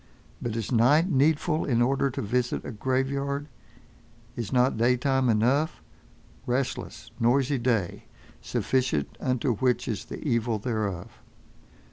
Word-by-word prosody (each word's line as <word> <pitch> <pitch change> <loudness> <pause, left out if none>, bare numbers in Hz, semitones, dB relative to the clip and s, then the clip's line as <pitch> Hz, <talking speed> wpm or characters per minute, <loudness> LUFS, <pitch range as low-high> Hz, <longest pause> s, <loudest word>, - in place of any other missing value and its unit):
But 115 -2 -3
is 115 0 -3
night 145 +10 +4
needful 155 +3 +2
in 120 -4 +1
order 135 +3 +2
to 125 - -4
visit 125 +4 -1
a - - -5
graveyard? 140 +4 -1 0.9
Is 115 -4 -4
not 125 0 +3
daytime 125 +3 +2
enough—restless, 125 +1 -2
noisy 130 +3 +2
day, 115 -7 -1 0.4
sufficient 125 - -1
unto 125 0 0
which 125 0 +1
is 105 -5 -3
the - - -7
evil 115 -3 +1
thereof? 105 -3 -3
125 Hz, 115 wpm, -27 LUFS, 115-135 Hz, 0.9 s, night